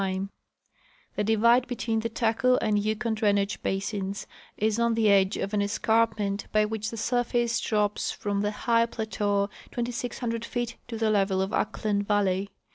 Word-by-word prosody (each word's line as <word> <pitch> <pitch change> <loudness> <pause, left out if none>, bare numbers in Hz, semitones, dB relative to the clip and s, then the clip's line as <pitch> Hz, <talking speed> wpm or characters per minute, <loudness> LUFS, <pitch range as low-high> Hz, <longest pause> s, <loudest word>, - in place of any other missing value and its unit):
The 210 - 0
divide 235 +4 +4
between 235 -2 -1
the 230 +1 -2
Taku 230 +2 +2
and 215 -4 +1
Yukon 220 +2 -1
drainage 205 -2 +1
basins 195 0 -2 0.3
is 215 +1 +1
on 235 -1 +2
the 220 -2 +4
edge 195 0 +3
of 200 - -3
an 205 - +2
escarpment 210 -1 +1
by 215 0 +3
which 215 0 -3
the 230 - -7
surface 240 0 0
drops 210 -2 0
from 205 -1 -2
the 205 - +1 0.2
high 230 -1 +4
plateau 205 -3 -1 0.2
2,600 235 -1 -3
feet 240 0 -3
to 230 -2 -5
the 220 -1 +1
level 195 -2 +2
of 190 +1 -1
Ahklen 210 -1 0
valley. 200 -1 +1
215 Hz, 155 wpm, -27 LUFS, 205-230 Hz, 0.3 s, divide